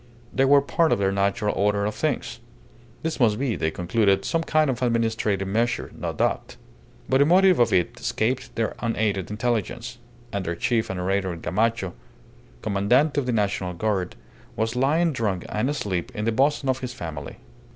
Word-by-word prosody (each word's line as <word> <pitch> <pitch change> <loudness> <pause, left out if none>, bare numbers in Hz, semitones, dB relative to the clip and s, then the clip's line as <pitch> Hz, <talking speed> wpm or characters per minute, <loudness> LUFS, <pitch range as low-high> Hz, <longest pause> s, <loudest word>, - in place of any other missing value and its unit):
They 135 - +3
were 140 +1 +5
part 160 +3 +2
of - - +3
the 95 -1 +1
natural 100 +2 0
order 100 0 +1
of 105 - -1
things. - - -2 0.6
This 160 -1 -2
must 110 -4 +3
be, 130 -3 -1
they 80 - 0
concluded, 95 +4 +1
some 165 - 0
kind 155 -1 +2
of 130 -2 -2
administrative 115 -5 0
measure, 115 +4 0
no - - -3
doubt. - - -1 0.5
But 130 - +3
the 140 - +6
motive 185 0 +5
of 120 - +4
it 90 - +1
escaped 125 +3 -1
their 115 -2 -1
unaided 110 -5 -1
intelligence, 120 +2 -2 0.3
and 100 -1 -1
their 85 -1 -2
chief 115 +5 0
and 95 -1 -3
orator, 95 0 -1
Gamacho, 105 +1 -1 0.7
Commandante 125 +10 +2
of 130 - -3
the - - +1
National 100 -4 0
Guard, 95 0 -1 0.4
was 115 +2 -1
lying 155 +6 +2
drunk 105 -8 -2
and 110 +5 0
asleep 105 -8 -2
in 105 -1 -2
the 115 - +2
bosom 135 +4 +1
of 130 0 +1
his 125 -2 -6
family. 80 - -6
110 Hz, 175 wpm, -24 LUFS, 100-130 Hz, 0.7 s, the